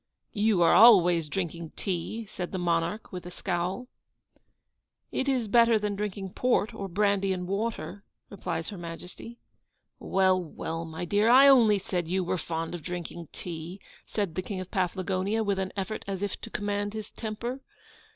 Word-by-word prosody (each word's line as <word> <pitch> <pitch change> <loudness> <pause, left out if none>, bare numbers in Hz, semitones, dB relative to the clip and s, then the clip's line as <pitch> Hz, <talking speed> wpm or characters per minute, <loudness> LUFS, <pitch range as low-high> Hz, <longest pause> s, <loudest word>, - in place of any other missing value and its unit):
'You 210 -5 +3
are 165 - +5
always 180 -7 +7
drinking 170 -2 -4
tea,' 200 +4 -3
said 180 -3 -6
the 190 - -3
monarch, 175 +4 -1
with 180 -2 -6
a - - -5
scowl. 180 +6 -3 1.2
'It 265 - -1
is 250 -4 +1
better 230 +1 +5
than 210 -1 -2
drinking 195 -2 -4
port 240 -3 +1
or 200 -3 -5
brandy 200 +1 +1
and 180 -1 -2
water;' 205 0 -3 0.2
replies 175 -4 -4
Her 200 - -7
Majesty. 180 +7 -8 0.6
'Well, 185 -1 +2
well, 165 0 -5
my 160 +2 -5
dear, 205 +5 +3
I 265 +3 +8
only 235 -7 +6
said 180 -3 -3
you 185 +2 0
were 180 +1 -1
fond 165 +1 -3
of 175 - -5
drinking 170 0 -6
tea,' 170 +2 -7 0.3
said 200 -6 -2
the 185 - -2
King 190 +1 -5
of 185 0 -7
Paflagonia, 190 +3 0
with 200 -2 0
an 190 -1 -2
effort 200 +3 -3
as 195 0 -3
if 205 - -3
to 225 - -7
command 205 -1 -2
his 215 -1 -6
temper. 235 +4 -5
195 Hz, 170 wpm, -28 LUFS, 175-215 Hz, 1.2 s, I